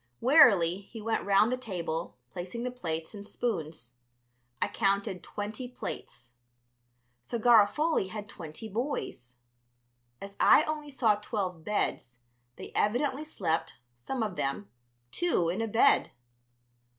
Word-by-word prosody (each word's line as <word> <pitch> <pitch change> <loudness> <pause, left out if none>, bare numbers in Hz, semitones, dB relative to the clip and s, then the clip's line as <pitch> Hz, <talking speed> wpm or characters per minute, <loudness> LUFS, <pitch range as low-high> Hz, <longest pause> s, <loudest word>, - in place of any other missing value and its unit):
Wearily 225 - +6
he 230 - -8
went 225 +1 -1
round 205 +3 +4
the 255 - 0
table, 175 -8 -4 0.2
placing 185 - -5
the 250 - -2
plates 165 -9 -4
and 205 -1 -8
spoons. 155 - -4 0.6
I - - +1
counted 195 -1 0
twenty 210 +6 -6
plates. 120 - -8 0.9
So 235 - -4
Garofoli 235 - +4
had 210 0 -6
twenty 170 +1 -9
boys. 205 - -4 0.8
As 200 0 -9
I 305 - +7
only 305 -1 -4
saw 230 -6 +2
twelve 195 -6 -4
beds, 145 - -2 0.4
they - - -9
evidently 265 +7 +1
slept, 175 - -2 0.2
some 225 - -3
of 210 -4 -4
them, 105 -7 -3 0.4
two 320 - +1
in 185 +6 -1
a 225 - -1
bed. 225 +2 +4
205 Hz, 125 wpm, -29 LUFS, 170-240 Hz, 0.9 s, I